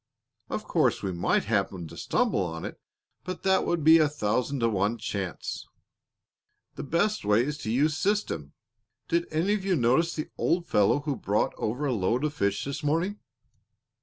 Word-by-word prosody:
Of -, -, -3 dB
course, -, -, +1 dB
we 95 Hz, -, -1 dB
might 85 Hz, -1 st, +1 dB
happen 100 Hz, -5 st, -1 dB
to -, -, -11 dB
stumble -, -, 0 dB
on 80 Hz, -2 st, -4 dB
it, -, -, -8 dB, 0.4 s
but 185 Hz, -, -6 dB
that 190 Hz, 0 st, +2 dB
would 170 Hz, -3 st, 0 dB
be 160 Hz, +2 st, +8 dB
a 155 Hz, -2 st, +4 dB
thousand 125 Hz, 0 st, -1 dB
to 115 Hz, -, +3 dB
one 105 Hz, +2 st, 0 dB
chance. 100 Hz, -5 st, -4 dB, 1.1 s
The -, -, -6 dB
best 190 Hz, +9 st, 0 dB
way 105 Hz, +3 st, +3 dB
is 150 Hz, +1 st, -4 dB
to 110 Hz, -, -3 dB
use 145 Hz, +5 st, +2 dB
system. 175 Hz, -, -1 dB, 0.6 s
Did 170 Hz, +1 st, +1 dB
any 165 Hz, +6 st, +1 dB
of 210 Hz, -2 st, -1 dB
you 190 Hz, -1 st, +1 dB
notice 135 Hz, +6 st, +2 dB
the 155 Hz, -, -4 dB
old 175 Hz, 0 st, +1 dB
fellow 105 Hz, +4 st, +3 dB
who 145 Hz, -1 st, -2 dB
brought 105 Hz, -2 st, 0 dB
over 125 Hz, +7 st, -2 dB
a 135 Hz, -, +1 dB
load 115 Hz, +5 st, 0 dB
of 150 Hz, -1 st, 0 dB
fish 100 Hz, -6 st, -1 dB
this 140 Hz, 0 st, -4 dB
morning?" 165 Hz, +8 st, 0 dB
140 Hz, 180 wpm, -27 LUFS, 105-165 Hz, 1.1 s, be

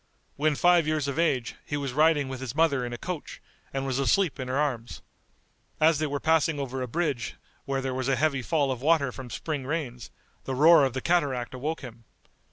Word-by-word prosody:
When 150 Hz, +1 st, +1 dB
five 175 Hz, 0 st, +4 dB
years 155 Hz, -2 st, 0 dB
of 140 Hz, +2 st, -2 dB
age, 130 Hz, -8 st, 0 dB
he 145 Hz, -, -3 dB
was 140 Hz, -3 st, -3 dB
riding 150 Hz, -1 st, +3 dB
with 130 Hz, -1 st, -6 dB
his 130 Hz, -1 st, -5 dB
mother 150 Hz, -5 st, +2 dB
in 120 Hz, -, -4 dB
a 120 Hz, -, -5 dB
coach, 175 Hz, +3 st, -6 dB, 0.3 s
and 135 Hz, 0 st, -3 dB
was 135 Hz, 0 st, -1 dB
asleep 145 Hz, +6 st, +2 dB
in 130 Hz, -, -4 dB
her 130 Hz, +1 st, -1 dB
arms. 130 Hz, -6 st, -2 dB, 0.8 s
As 155 Hz, -1 st, +4 dB
they 155 Hz, -, 0 dB
were 145 Hz, 0 st, -2 dB
passing 160 Hz, -1 st, +2 dB
over 135 Hz, -1 st, -4 dB
a 125 Hz, -, -2 dB
bridge 145 Hz, -4 st, -2 dB, 0.3 s
where 135 Hz, -1 st, -1 dB
there 130 Hz, -1 st, -2 dB
was 130 Hz, 0 st, -2 dB
a 135 Hz, -, +3 dB
heavy 140 Hz, -2 st, +1 dB
fall 140 Hz, +3 st, +1 dB
of 125 Hz, -2 st, -4 dB
water 145 Hz, -3 st, +3 dB
from 130 Hz, 0 st, -9 dB
spring 145 Hz, +4 st, -4 dB
rains, 135 Hz, -7 st, -4 dB, 0.4 s
the 135 Hz, -, -3 dB
roar 155 Hz, +1 st, +7 dB
of 130 Hz, -, -2 dB
the 130 Hz, -, -3 dB
cataract 140 Hz, -9 st, 0 dB
awoke 150 Hz, +6 st, -3 dB
him. 115 Hz, -4 st, -11 dB
140 Hz, 215 wpm, -27 LUFS, 130-155 Hz, 0.8 s, roar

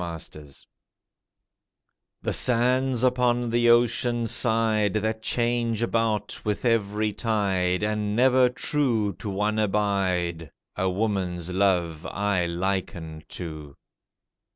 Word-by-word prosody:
HER 85 Hz, -1 st, -5 dB, 0.2 s
LOVE 75 Hz, -3 st, -13 dB, 1.6 s
The -, -, -1 dB
sands 125 Hz, +1 st, +3 dB
upon 120 Hz, -2 st, +1 dB
the 120 Hz, 0 st, +3 dB
ocean 120 Hz, 0 st, +2 dB
side 110 Hz, -3 st, +1 dB
That 110 Hz, +1 st, -1 dB
change 120 Hz, -1 st, 0 dB
about 110 Hz, -3 st, -1 dB
with 105 Hz, +3 st, -2 dB
every 105 Hz, -2 st, 0 dB
tide, 95 Hz, -4 st, 0 dB
And 105 Hz, -1 st, -1 dB
never 130 Hz, +1 st, +4 dB
true 125 Hz, -6 st, 0 dB
to 105 Hz, -, -5 dB
one 105 Hz, +2 st, -1 dB
abide, 95 Hz, -6 st, -1 dB, 0.3 s
A 95 Hz, 0 st, 0 dB
woman's 90 Hz, -3 st, -2 dB
love 90 Hz, -4 st, 0 dB
I 100 Hz, -4 st, -1 dB
liken 85 Hz, -3 st, -4 dB
to. 75 Hz, -5 st, -8 dB
105 Hz, 105 wpm, -25 LUFS, 90-115 Hz, 1.6 s, never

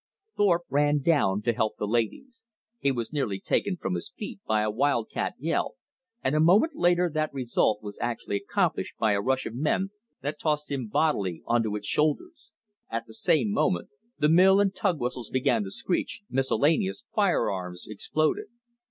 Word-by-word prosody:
Thorpe 175 Hz, -4 st, +3 dB
ran 145 Hz, 0 st, +2 dB
down 105 Hz, -, +2 dB
to 120 Hz, -, +2 dB
help 110 Hz, 0 st, -1 dB
the -, -, -2 dB
ladies. 120 Hz, -, -2 dB, 0.4 s
He 140 Hz, -, +2 dB
was 120 Hz, +1 st, -3 dB
nearly 115 Hz, -10 st, -1 dB
taken 190 Hz, -, 0 dB
from 95 Hz, -, -3 dB
his 85 Hz, -, -4 dB
feet 205 Hz, -, -6 dB
by 110 Hz, -1 st, +2 dB
a 105 Hz, -, 0 dB
wild 120 Hz, -1 st, 0 dB
cat -, -, -2 dB
yell, 160 Hz, +4 st, -1 dB, 0.5 s
and 130 Hz, -, +1 dB
a -, -, +3 dB
moment 200 Hz, -, +5 dB
later 175 Hz, 0 st, +3 dB
that 155 Hz, -1 st, -1 dB
result 120 Hz, -5 st, 0 dB
was 100 Hz, -1 st, -8 dB
actually 115 Hz, -4 st, -2 dB
accomplished -, -, -1 dB
by 110 Hz, -, +2 dB
a 100 Hz, -1 st, +1 dB
rush 130 Hz, +3 st, 0 dB
of -, -, -5 dB
men 155 Hz, +9 st, 0 dB, 0.3 s
that 145 Hz, +2 st, -3 dB
tossed 150 Hz, -2 st, -1 dB
him 130 Hz, -5 st, -2 dB
bodily 105 Hz, -, 0 dB
onto 115 Hz, -3 st, +1 dB
its 105 Hz, 0 st, -5 dB
shoulders. 230 Hz, -, -1 dB, 0.4 s
At 115 Hz, 0 st, -3 dB
the 110 Hz, -, -14 dB
same 115 Hz, -1 st, +2 dB
moment, 90 Hz, -3 st, 0 dB, 0.3 s
the 150 Hz, -, +3 dB
mill 185 Hz, +5 st, +6 dB
and 200 Hz, -1 st, +2 dB
tug 185 Hz, -5 st, 0 dB
whistles 125 Hz, -2 st, -3 dB
began 125 Hz, -3 st, +1 dB
to -, -, -5 dB
screech, 185 Hz, -, -2 dB
miscellaneous 155 Hz, -, +1 dB
fire 195 Hz, -, +2 dB
arms 90 Hz, -2 st, -5 dB
exploded. 155 Hz, +9 st, -1 dB
135 Hz, 180 wpm, -27 LUFS, 110-170 Hz, 0.5 s, mill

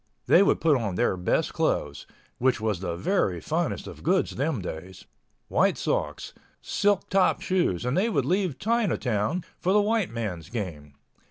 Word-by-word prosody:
They -, -, +6 dB
would 200 Hz, -, +3 dB
put 155 Hz, -3 st, +3 dB
on 105 Hz, -7 st, -3 dB
their 120 Hz, -1 st, +1 dB
best 90 Hz, -1 st, 0 dB
clothes—which 115 Hz, -, -2 dB
was 105 Hz, -4 st, -1 dB
the 90 Hz, -3 st, -3 dB
very 95 Hz, -, 0 dB
finest -, -, -2 dB
of -, -, -10 dB
goods -, -, +1 dB
them 140 Hz, 0 st, -1 dB
days—white 90 Hz, 0 st, -3 dB
socks, -, -, -2 dB, 0.3 s
silk 205 Hz, -1 st, 0 dB
top 195 Hz, -1 st, +3 dB
shoes, 170 Hz, -, 0 dB
and 125 Hz, -, 0 dB
they 200 Hz, +6 st, +2 dB
would 140 Hz, -, 0 dB
leave 180 Hz, -2 st, 0 dB
Chinatown 170 Hz, -, 0 dB, 0.2 s
for 185 Hz, -, 0 dB
the 210 Hz, -, +5 dB
white 210 Hz, -2 st, +1 dB
man's 105 Hz, -8 st, -5 dB
game. 80 Hz, -11 st, -6 dB
125 Hz, 155 wpm, -26 LUFS, -, 0.3 s, They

